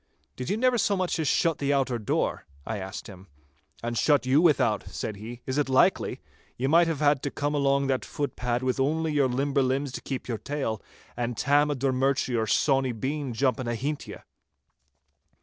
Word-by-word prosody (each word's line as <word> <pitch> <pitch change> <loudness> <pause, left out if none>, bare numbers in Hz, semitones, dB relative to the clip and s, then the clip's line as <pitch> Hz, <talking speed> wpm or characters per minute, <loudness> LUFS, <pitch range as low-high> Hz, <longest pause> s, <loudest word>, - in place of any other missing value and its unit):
'Did 125 - -5
you 205 - +1
never 250 0 +2
so 205 -1 +2
much 185 -2 -1
as 155 - 0
shut 165 +1 +2
the 140 0 0
outer 135 -4 +1
door?' 105 - -1 0.2
I 110 -2 -3
asked 95 +1 -6
him. 95 -1 -12 0.6
'And 120 0 -2
shut 145 +2 +3
you 135 +4 +4
without,' 145 - +2
said 105 - -5
he. 115 +4 -8
'Is 130 +2 -1
it 145 - 0
likely? 130 - +2 0.4
Ye 125 - -1
might 165 +5 +5
have 160 -3 -2
had 145 -2 +3
to 140 - -2
come 145 +1 -2
along 140 -1 +2
that 135 -1 0
footpad 125 -3 -2
with 130 0 0
only 155 +3 +1
your 140 -3 +3
limber 140 +3 0
legs 135 +1 0
to - - -6
keep 135 -2 -5
your 115 -3 -3
tail, 140 -7 -3 0.3
and 120 -1 -3
Tam 145 +1 +3
o' 145 - 0
Drummurchie 130 -1 +1
or 110 -1 0
Sawny 135 +2 +2
Bean 135 +4 -3
jumping 130 0 0
ahint 135 +6 -3
ye! - - -7
135 Hz, 195 wpm, -27 LUFS, 125-145 Hz, 0.6 s, might